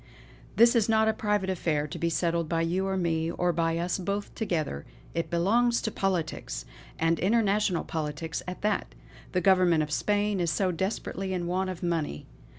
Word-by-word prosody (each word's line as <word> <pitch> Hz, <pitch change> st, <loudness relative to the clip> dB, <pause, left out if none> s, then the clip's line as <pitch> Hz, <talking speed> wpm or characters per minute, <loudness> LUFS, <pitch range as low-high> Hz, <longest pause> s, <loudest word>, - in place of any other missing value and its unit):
This 235 Hz, +2 st, +6 dB
is 225 Hz, -2 st, +3 dB
no 220 Hz, 0 st, +4 dB
private 210 Hz, -3 st, 0 dB
affair 160 Hz, -5 st, 0 dB
to 150 Hz, -, -7 dB
be 170 Hz, -, +1 dB
settled 170 Hz, -1 st, 0 dB
by 165 Hz, -1 st, +1 dB
you 185 Hz, +3 st, 0 dB
or 190 Hz, 0 st, -1 dB
me, 165 Hz, -2 st, 0 dB
or 175 Hz, +1 st, 0 dB
by 165 Hz, 0 st, +1 dB
us 175 Hz, +2 st, -1 dB
both 200 Hz, +3 st, -3 dB
together. 155 Hz, -, -2 dB, 0.3 s
It 165 Hz, -, -2 dB
belongs 235 Hz, +8 st, +2 dB
to 220 Hz, -, -1 dB
politics! 165 Hz, -, -2 dB, 0.3 s
and 165 Hz, 0 st, +1 dB
international 205 Hz, -2 st, +2 dB
politics 160 Hz, 0 st, -4 dB
at 180 Hz, +2 st, -6 dB
that. 210 Hz, -, -1 dB, 0.4 s
The 180 Hz, -, +2 dB
Government 180 Hz, -5 st, +4 dB
of 150 Hz, -, -6 dB
Spain 205 Hz, +3 st, +1 dB
is 170 Hz, -2 st, 0 dB, 0.2 s
desperately 190 Hz, 0 st, -2 dB
in 175 Hz, -1 st, -2 dB
want 185 Hz, +2 st, -1 dB
of 180 Hz, -2 st, -6 dB
money. 165 Hz, -, -2 dB
180 Hz, 170 wpm, -28 LUFS, 165-200 Hz, 0.4 s, This